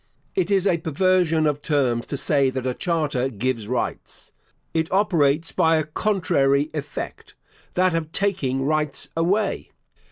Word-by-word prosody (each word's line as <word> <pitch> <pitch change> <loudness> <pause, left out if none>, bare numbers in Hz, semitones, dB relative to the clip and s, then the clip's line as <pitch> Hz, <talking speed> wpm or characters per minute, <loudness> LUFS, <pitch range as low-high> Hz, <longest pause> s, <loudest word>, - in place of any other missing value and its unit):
It 375 - 0
is 195 -2 +2
a 175 -4 +2
perversion 165 0 +2
of 145 -1 0
terms 130 -7 0
to 140 - -3
say 140 -1 +2
that 130 -1 -4
a 130 - 0
charter 150 -5 -1
gives 115 -1 -2
rights. 125 +1 -4 0.4
It 160 0 -1
operates 165 -6 +2
by 165 0 +3
a 155 - +1
contrary 150 -5 +1
effect 145 -1 -6 0.4
that 185 0 +3
of 160 -1 -2
taking 140 -11 0
rights 150 -1 0
away. 195 +5 0
155 Hz, 140 wpm, -23 LUFS, 135-175 Hz, 0.4 s, by